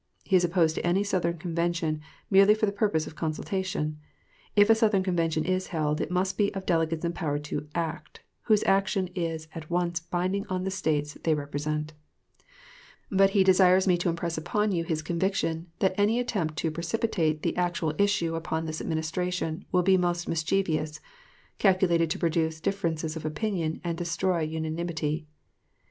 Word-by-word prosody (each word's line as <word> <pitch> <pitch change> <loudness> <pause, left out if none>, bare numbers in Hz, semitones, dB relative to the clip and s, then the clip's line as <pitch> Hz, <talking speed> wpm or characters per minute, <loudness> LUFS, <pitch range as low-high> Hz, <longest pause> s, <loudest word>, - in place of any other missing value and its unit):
He 190 - +1
is 180 - +5
opposed 170 -2 +2
to - - -4
any 180 +3 +2
Southern 175 -4 0
convention, 170 -1 -1 0.3
merely 195 +2 +7
for 215 - +1
the 200 - 0
purpose 200 -6 0
of - - -9
consultation. 155 -1 -2 0.6
If 205 -1 +6
a - - +9
Southern 215 -4 +2
convention 165 -4 0
is 185 0 0
held, 150 -3 -1
it - - -2
must 185 +2 -1
be 205 -1 +3
of 190 -1 -4
delegates 165 -1 0
empowered 155 -4 -2
to 150 0 -4
act, 160 -2 -4 0.2
whose 215 -2 +4
action 195 -1 +2
is 165 -3 -3
at 160 -2 -8
once 175 0 0
binding 180 +4 -2
on 185 -1 -2
the 190 - -2
States 150 -5 -1
they 160 -2 +3
represent. 150 +1 -3 1.2
But 195 0 +5
he 195 - +6
desires 185 0 +5
me 180 - +5
to 175 0 0
impress 170 -1 -2
upon 210 +6 0
you 170 -3 0
his 160 -2 -2
conviction, 170 -1 -1
that 190 0 +2
any 215 +4 +3
attempt 190 -11 -1
to 160 +1 0
precipitate 170 -2 -1
the - - 0
actual 175 -3 0
issue 200 -5 +2
upon 160 0 -2
this 155 -1 -4
Administration 160 +1 -2
will 180 -1 +3
be 190 +1 +5
most 175 -1 0
mischievous 160 -2 0 0.6
calculated 180 -4 +3
to - - -1
produce 160 -1 0
differences 160 -3 -2
of 160 - -6
opinion 160 0 -2
and 170 -1 -3
destroy 175 +1 0
unanimity. 160 -1 -2
170 Hz, 165 wpm, -27 LUFS, 160-190 Hz, 1.2 s, a